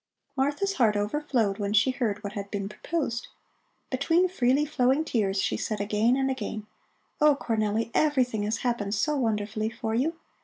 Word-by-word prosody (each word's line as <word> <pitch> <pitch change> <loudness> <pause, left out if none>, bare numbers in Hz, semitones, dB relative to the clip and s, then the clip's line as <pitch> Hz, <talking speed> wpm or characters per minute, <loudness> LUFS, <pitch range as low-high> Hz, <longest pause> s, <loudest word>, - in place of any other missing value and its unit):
Martha's 290 +9 0
heart 220 -4 +4
overflowed 220 -2 0
when 205 0 -1
she 220 +5 +4
heard 225 -6 -2
what 200 - -5
had 200 -1 -5
been 200 -1 -3
proposed. 250 +1 -3 0.6
Between 325 +7 +3
freely 275 -4 +2
flowing 280 +1 +2
tears 200 -8 0
she - - 0
said 215 -2 -3
again 210 +4 +2
and 270 0 +1
again: 220 -5 -4 0.6
"Oh, 300 -1 +6
Cornelli! 220 0 -1
Everything 255 -8 +2
has 215 +2 -1
happened 220 -4 0
so 300 +9 +1
wonderfully 215 -3 -1
for 220 0 -4
you. 285 +9 +1
230 Hz, 160 wpm, -27 LUFS, 210-275 Hz, 0.6 s, Oh